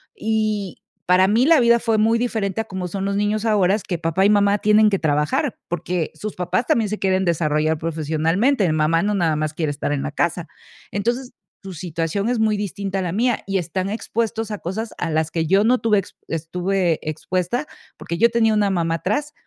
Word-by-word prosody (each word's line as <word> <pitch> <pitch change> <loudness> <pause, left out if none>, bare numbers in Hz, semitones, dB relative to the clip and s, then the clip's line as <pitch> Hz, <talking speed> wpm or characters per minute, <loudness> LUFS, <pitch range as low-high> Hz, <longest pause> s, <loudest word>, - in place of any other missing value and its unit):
y 215 -3 -1 0.3
para 185 +1 +5
mí 225 +5 +3
la 325 -3 +6
vida 235 0 +4
fue 225 -1 0
muy 225 +2 +3
diferente 220 -4 -1
a - - -6
como 190 -3 -5
son 195 +2 -4
los 200 0 -1
niños 210 +1 0
ahora, 200 -3 +3
que 175 - -1
papá 165 +3 +1
y - - +5
mamá 205 -1 +3
tienen 215 0 +4
que 195 - +1
trabajar, 150 -1 0
porque 175 -1 -2
sus 215 -1 -6
papás 180 +7 -1
también 220 -3 +2
se 215 - -3
quieren 190 0 +1
desarrollar 155 -2 +1
profesionalmente. 165 - 0
Eh, 160 - +1
mamá 155 +2 +2
no 205 0 0
nada 165 -4 +1
más 155 0 -2
quiere 155 -3 -1
estar 145 0 -2
en 140 - -2
la 150 - -3
casa. 170 +2 -1 0.4
Entonces, 240 +5 -2 0.3
tu 195 -1 -8
situación 170 +5 -2
es 245 - 0
muy 215 -1 +2
distinta 195 -1 -3
a - - -1
la 175 -2 -3
mía 240 +3 0
y 195 0 0
están 185 +2 -2
expuestos 225 0 -2
a 210 - -4
cosas 215 +6 -4
a - - -1
las 160 0 0
que 160 -1 -1
yo 195 +4 +4
no 245 +3 +3
tuve 215 -3 +2
ex 190 - -9
estuve 175 +1 -1
expuesta, 180 - -2 0.3
porque 170 - -5
yo 235 - +5
tenía 225 -1 +2
una 210 -1 +2
mamá 165 -3 0
atrás 250 - -2
195 Hz, 210 wpm, -21 LUFS, 165-215 Hz, 0.4 s, la